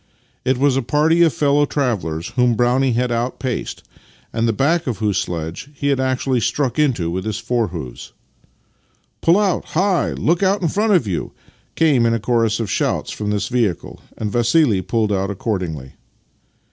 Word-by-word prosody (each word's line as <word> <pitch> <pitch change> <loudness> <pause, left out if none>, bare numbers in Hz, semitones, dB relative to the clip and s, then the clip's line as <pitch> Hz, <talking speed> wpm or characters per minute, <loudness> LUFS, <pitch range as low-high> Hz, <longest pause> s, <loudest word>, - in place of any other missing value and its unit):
It 130 0 +1
was 140 0 +2
a 135 - +1
party 150 +7 +2
of 165 -2 +5
fellow 145 0 +2
travellers 90 - -2
whom 125 -1 +2
Brownie 125 +2 +2
had 125 +1 0
outpaced, 125 +2 -3 0.5
and 115 0 +1
the - - +3
back 160 +9 +1
of 120 - -2
whose 105 -3 0
sledge 85 - -5
he 140 0 -1
had 140 -2 +1
actually 130 -1 0
struck 130 +5 -1
into 120 - +1
with 95 +2 -3
his 110 -1 -3
fore 115 0 0
hoofs. 80 -9 -8 0.6
" - - -42
Pull 170 +3 +4
out! 200 -4 +1
Hi! 185 -1 +1
Look 170 +4 0
out 195 0 +2
in 165 - +2
front 210 +4 +1
of 175 - +3
you! 95 -5 -3 0.2
" - - -37
came 140 -8 +3
in 115 - +2
a - - -1
chorus 115 0 +1
of 110 -4 -3
shouts - - -1
from 105 -1 -4
this 105 -1 -1
vehicle, 115 - -2 0.2
and 105 -2 -3
Vassili 120 - +3
pulled 110 +2 0
out 95 0 -1
accordingly. 90 - -4
120 Hz, 185 wpm, -19 LUFS, 105-145 Hz, 0.6 s, of